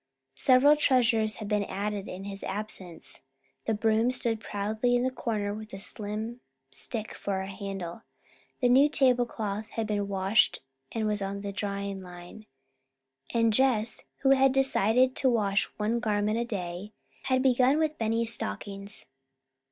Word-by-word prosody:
Several 270 Hz, +3 st, +6 dB
treasures 230 Hz, -7 st, +3 dB
had 215 Hz, -, -6 dB
been 210 Hz, -1 st, +1 dB
added 200 Hz, +1 st, -3 dB
in 185 Hz, +1 st, -7 dB
his 195 Hz, 0 st, -5 dB
absence. 190 Hz, -5 st, -5 dB, 0.4 s
The 220 Hz, -, +1 dB
broom 220 Hz, +2 st, +2 dB
stood 235 Hz, -3 st, 0 dB
proudly 220 Hz, +4 st, -1 dB
in 245 Hz, -, +2 dB
the 260 Hz, -, +1 dB
corner 210 Hz, -5 st, -2 dB
with 215 Hz, 0 st, -8 dB
a -, -, -5 dB
slim 215 Hz, +4 st, -3 dB, 0.3 s
stick 220 Hz, -3 st, -4 dB
for 195 Hz, -1 st, -3 dB
a 190 Hz, -, -5 dB
handle. 195 Hz, -1 st, -6 dB, 0.6 s
The 245 Hz, -, +4 dB
new 270 Hz, +4 st, +6 dB
tablecloth 235 Hz, -6 st, +1 dB
had 225 Hz, 0 st, -2 dB
been 205 Hz, -2 st, -1 dB
washed 195 Hz, +2 st, +2 dB, 0.3 s
and 220 Hz, -1 st, -1 dB
was 210 Hz, -1 st, 0 dB, 0.3 s
drying 200 Hz, -1 st, -3 dB
on -, -, -8 dB
the -, -, -10 dB
line. 180 Hz, +4 st, -11 dB, 0.9 s
And 230 Hz, -1 st, +3 dB
Jess, 225 Hz, -3 st, +2 dB, 0.2 s
who 270 Hz, -, +4 dB
had 270 Hz, -1 st, +5 dB
decided 255 Hz, -1 st, +3 dB
to 265 Hz, -, +3 dB
wash 200 Hz, -4 st, +2 dB
one 220 Hz, +3 st, 0 dB
garment 215 Hz, -1 st, 0 dB
a 235 Hz, -, 0 dB
day, 195 Hz, -1 st, -5 dB, 0.3 s
had 260 Hz, 0 st, +2 dB
begun 260 Hz, +2 st, +4 dB
with 310 Hz, -1 st, 0 dB
Benny's 225 Hz, +1 st, 0 dB
stockings. 200 Hz, -, -5 dB
215 Hz, 150 wpm, -28 LUFS, 200-245 Hz, 0.9 s, Several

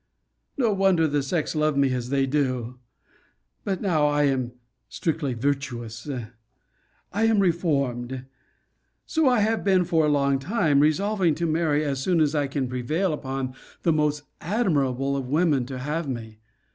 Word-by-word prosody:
No 235 Hz, -6 st, +2 dB
wonder 190 Hz, -4 st, +3 dB
the 145 Hz, -1 st, 0 dB
sex 150 Hz, +3 st, -1 dB
love 155 Hz, -2 st, +1 dB
me 135 Hz, -2 st, +3 dB
as 125 Hz, -1 st, -3 dB
they 135 Hz, 0 st, +2 dB
do! 130 Hz, -3 st, -1 dB, 0.8 s
But 195 Hz, -1 st, -2 dB
now 160 Hz, -7 st, +2 dB
I 145 Hz, 0 st, +2 dB
am 130 Hz, -4 st, 0 dB, 0.4 s
strictly 150 Hz, -6 st, -2 dB
virtuous. 120 Hz, -2 st, -3 dB, 1.0 s
I 215 Hz, +3 st, +2 dB
am 225 Hz, -1 st, +3 dB
reformed. 140 Hz, -8 st, 0 dB, 0.8 s
So 320 Hz, -5 st, +2 dB
I 245 Hz, -4 st, +3 dB
have 220 Hz, +2 st, +1 dB
been 190 Hz, -3 st, +3 dB
for 165 Hz, -2 st, +2 dB
a 150 Hz, -, +3 dB
long 140 Hz, -2 st, +2 dB
time, 160 Hz, -, +2 dB
resolving 175 Hz, +3 st, +2 dB
to 170 Hz, -, -2 dB
marry 155 Hz, -2 st, +1 dB
as 135 Hz, -2 st, -2 dB
soon 175 Hz, +3 st, +2 dB
as 150 Hz, -1 st, +2 dB
I 145 Hz, -2 st, +1 dB
can 135 Hz, -1 st, -2 dB
prevail 150 Hz, +9 st, -1 dB
upon 135 Hz, -3 st, -4 dB, 0.3 s
the 165 Hz, -, +3 dB
most 150 Hz, -1 st, 0 dB, 0.2 s
admirable 140 Hz, -, 0 dB
of 135 Hz, -2 st, -3 dB
women 150 Hz, -4 st, +2 dB
to 130 Hz, -1 st, -5 dB
have 150 Hz, +4 st, -3 dB
me. 110 Hz, -3 st, -6 dB
145 Hz, 160 wpm, -25 LUFS, 135-170 Hz, 1.0 s, wonder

